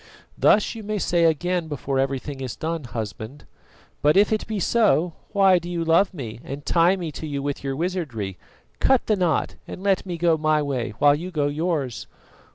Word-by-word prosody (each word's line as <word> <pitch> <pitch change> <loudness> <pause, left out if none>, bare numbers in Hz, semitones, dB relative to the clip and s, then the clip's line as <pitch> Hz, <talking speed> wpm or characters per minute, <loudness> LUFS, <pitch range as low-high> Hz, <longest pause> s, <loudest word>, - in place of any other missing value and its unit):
"Thus 210 - +3
you 225 - -8
may 215 0 -3
say 175 -3 +2
again 170 +2 +1
before 140 -2 -2
everything 135 +1 -2
is 130 -3 -4
done, 160 -2 -3
husband; 115 +3 -6 0.6
but 150 +4 +4
if 205 +2 +4
it 215 - -2
be 215 -2 -2
so, 185 -5 +2 0.2
why 195 -2 +5
do 175 +1 -8
you 170 -1 -2
love 170 +4 +4
me 120 - -7
and 140 +1 -7
tie 175 +2 +4
me 170 -4 -5
to 155 - -7
you 140 -2 -3
with 145 -1 -3
your 135 -1 -2
wizardry? 140 - -3 0.4
Cut 265 -2 +3
the 215 - +2
knot, 180 -5 0
and 190 - -8
let 195 -2 +2
me 180 -3 -5
go 165 -1 +3
my 155 0 +2
way 130 -7 -2
while 145 -1 +5
you 170 +5 -4
go 155 -5 -1
yours." 145 -4 -2
160 Hz, 195 wpm, -23 LUFS, 140-180 Hz, 0.6 s, why